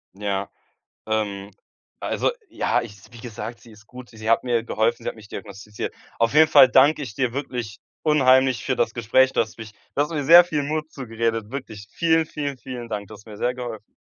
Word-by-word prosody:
Ja, 100 Hz, -1 st, -3 dB, 0.6 s
ähm, 100 Hz, -2 st, -2 dB, 0.5 s
also, -, -, 0 dB, 0.2 s
ja, 125 Hz, -, 0 dB
ich 105 Hz, -3 st, -10 dB
wie 120 Hz, -, -13 dB
gesagt, 115 Hz, 0 st, -7 dB
sie 115 Hz, -, -16 dB
ist 105 Hz, 0 st, -18 dB
gut. 125 Hz, -1 st, -12 dB
Sie 110 Hz, 0 st, -6 dB
hat 115 Hz, -, +3 dB
mir 120 Hz, -2 st, 0 dB
geholfen, 115 Hz, 0 st, 0 dB
sie -, -, -1 dB
hat -, -, -9 dB
mich 110 Hz, -2 st, -14 dB
diagnostiziert. 105 Hz, 0 st, -7 dB, 0.3 s
Auf 115 Hz, +3 st, +2 dB
jeden 155 Hz, +1 st, +7 dB
Fall 130 Hz, -, +8 dB
danke 145 Hz, +4 st, +5 dB
ich 120 Hz, -7 st, -7 dB
dir 125 Hz, -3 st, -1 dB
wirklich 125 Hz, -6 st, -5 dB, 0.2 s
unheimlich 130 Hz, -5 st, +4 dB
für -, -, -1 dB
das 110 Hz, -, 0 dB
Gespräch, 125 Hz, +3 st, +3 dB
du -, -, +3 dB
hast 110 Hz, 0 st, -6 dB
mich 110 Hz, -1 st, -10 dB
du 140 Hz, -, -5 dB
hast 150 Hz, +3 st, -1 dB
mir 150 Hz, -3 st, -2 dB
sehr 170 Hz, +4 st, +9 dB
viel 150 Hz, -4 st, -2 dB
Mut 155 Hz, +2 st, -3 dB
zugeredet. 115 Hz, -3 st, -3 dB
Wirklich 110 Hz, -6 st, -7 dB
vielen, 165 Hz, -1 st, +2 dB
vielen, 145 Hz, -3 st, -5 dB
vielen 125 Hz, -2 st, -8 dB
Dank. 100 Hz, -2 st, -4 dB
Du 110 Hz, -, -11 dB
hast 105 Hz, -, -17 dB
mir 105 Hz, -2 st, -11 dB
sehr 125 Hz, +3 st, 0 dB
geholfen. 120 Hz, -4 st, -7 dB
120 Hz, 210 wpm, -23 LUFS, 110-135 Hz, 0.6 s, sehr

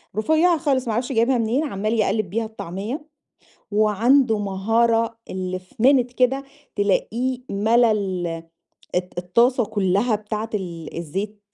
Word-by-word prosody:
رفيّعة 315 Hz, +10 st, +3 dB
خالص 270 Hz, -5 st, 0 dB
ما 225 Hz, -, 0 dB
أعرفش 245 Hz, +4 st, -2 dB
جايبها 240 Hz, +1 st, +2 dB
منين 235 Hz, +6 st, +1 dB
عَمّال 215 Hz, -5 st, -2 dB
يقلّب 215 Hz, -2 st, +1 dB
بيها 225 Hz, +4 st, -1 dB
الطعمية، 220 Hz, -, -6 dB, 0.7 s
وعنده 220 Hz, +3 st, +3 dB
مهارة 225 Hz, +3 st, +1 dB
اللي 185 Hz, 0 st, -3 dB
في 185 Hz, 0 st, -22 dB
minute 250 Hz, -2 st, +4 dB
كده 265 Hz, +3 st, +1 dB, 0.3 s
تلاقيه 235 Hz, +5 st, 0 dB
مَلا 225 Hz, +4 st, +3 dB
ال 190 Hz, -4 st, -2 dB, 0.7 s
الت 180 Hz, 0 st, -2 dB
الطاسة 235 Hz, +8 st, +2 dB
كلّها 205 Hz, +2 st, +1 dB
بتاعة 215 Hz, +1 st, -5 dB
ال 170 Hz, -6 st, -5 dB
الزيت 195 Hz, +6 st, -4 dB
220 Hz, 130 wpm, -22 LUFS, 195-245 Hz, 0.7 s, minute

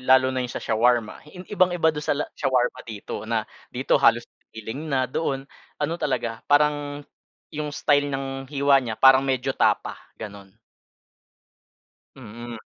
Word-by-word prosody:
lalo 130 Hz, 0 st, +4 dB
na 130 Hz, -, -1 dB
yung 125 Hz, -, -3 dB
sa -, -, -7 dB
shawarma 115 Hz, 0 st, +1 dB
i 180 Hz, +3 st, -11 dB
ibang-iba 180 Hz, -4 st, +3 dB
don 150 Hz, -, -4 dB
sa 150 Hz, -, 0 dB
la 150 Hz, -, -1 dB
shawarma 125 Hz, -1 st, 0 dB
dito, 110 Hz, -1 st, -7 dB
na 115 Hz, -2 st, 0 dB, 0.2 s
dito 130 Hz, +2 st, +1 dB
halos 115 Hz, 0 st, +4 dB, 0.3 s
giling 115 Hz, +8 st, -6 dB
na, 135 Hz, -3 st, +1 dB
doon 135 Hz, 0 st, -2 dB, 0.3 s
ano 150 Hz, +2 st, -1 dB
talaga, 115 Hz, -5 st, -2 dB
parang 145 Hz, 0 st, +2 dB, 0.5 s
'yong 150 Hz, -1 st, -3 dB
style 145 Hz, 0 st, +2 dB
ng 135 Hz, -1 st, -4 dB
hiwa 140 Hz, -1 st, +3 dB
niya 115 Hz, -4 st, -4 dB
parang 135 Hz, 0 st, +7 dB
medyo 135 Hz, -1 st, -1 dB
tapa, -, -, 0 dB, 0.2 s
ganun. 100 Hz, -3 st, -10 dB, 1.6 s
Mm. 120 Hz, -1 st, -9 dB
135 Hz, 145 wpm, -24 LUFS, 120-145 Hz, 1.6 s, parang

